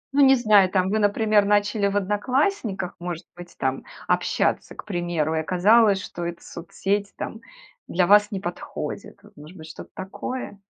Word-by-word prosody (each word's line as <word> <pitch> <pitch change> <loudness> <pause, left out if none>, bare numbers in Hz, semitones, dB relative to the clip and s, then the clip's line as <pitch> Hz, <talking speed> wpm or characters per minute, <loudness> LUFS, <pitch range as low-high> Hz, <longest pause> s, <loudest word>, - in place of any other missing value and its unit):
Ну, 285 - +5
не 270 0 +7
знаю 210 -6 +4
там, 185 0 +1
вы, 215 - +1
например, 210 0 +3
начали 205 0 +2
в 200 - 0
"Одноклассниках", 205 - -1
может 175 -2 -6
быть 175 -1 -12
там, 130 0 -2 0.2
общаться, - - 0
к - - -10
примеру, 175 -5 -1
и 160 - +1
оказалось, 200 +5 +4
что 175 - -7
эта 170 0 -5
соцсеть, 200 +4 -3
там, 225 - -6 0.5
для 180 0 +1
вас 205 +2 +5
не 195 -3 -4
подходит. 175 -2 -6
Вот, - - -19
может 155 +5 -13
быть, 160 -1 -11
что-то 160 - -10
такое? 200 +3 -6
195 Hz, 170 wpm, -24 LUFS, 175-210 Hz, 0.5 s, не